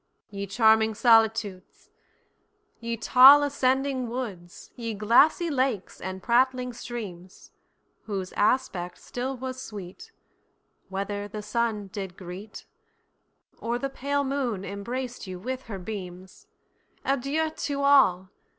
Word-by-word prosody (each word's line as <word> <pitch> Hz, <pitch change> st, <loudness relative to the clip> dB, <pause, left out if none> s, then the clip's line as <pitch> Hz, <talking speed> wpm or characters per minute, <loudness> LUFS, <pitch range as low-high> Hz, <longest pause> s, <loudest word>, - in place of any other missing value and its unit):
Ye 200 Hz, 0 st, -5 dB
charming 220 Hz, +1 st, +3 dB
solitudes, 225 Hz, -4 st, +2 dB, 0.9 s
Ye 235 Hz, 0 st, -3 dB
tall 265 Hz, +5 st, +8 dB
ascending 265 Hz, -2 st, 0 dB
woods, 205 Hz, -9 st, -7 dB
Ye 230 Hz, -2 st, -4 dB
glassy 280 Hz, -, +4 dB
lakes 260 Hz, -7 st, -1 dB
and 190 Hz, +1 st, -6 dB
prattling 250 Hz, +1 st, +2 dB
streams, 195 Hz, -7 st, -8 dB, 0.5 s
Whose 195 Hz, -3 st, -4 dB
aspect 190 Hz, -6 st, 0 dB
still 255 Hz, +2 st, -5 dB
was 260 Hz, +1 st, -6 dB
sweet, 195 Hz, -6 st, -9 dB, 0.8 s
Whether 200 Hz, +1 st, -4 dB
the 210 Hz, +1 st, -7 dB
sun 215 Hz, -1 st, -1 dB
did 190 Hz, -3 st, -6 dB
greet, 185 Hz, +4 st, -9 dB, 0.9 s
Or 235 Hz, +1 st, -2 dB
the 275 Hz, +2 st, -4 dB
pale 285 Hz, +2 st, -1 dB
moon 260 Hz, -8 st, -2 dB
embraced 240 Hz, +4 st, -5 dB
you 185 Hz, -1 st, -6 dB
with 255 Hz, +7 st, -5 dB
her 205 Hz, -4 st, -5 dB
beams—Adieu 220 Hz, -, -5 dB
to 280 Hz, -2 st, -3 dB
all! 190 Hz, -10 st, +4 dB
230 Hz, 110 wpm, -26 LUFS, 195-260 Hz, 0.9 s, tall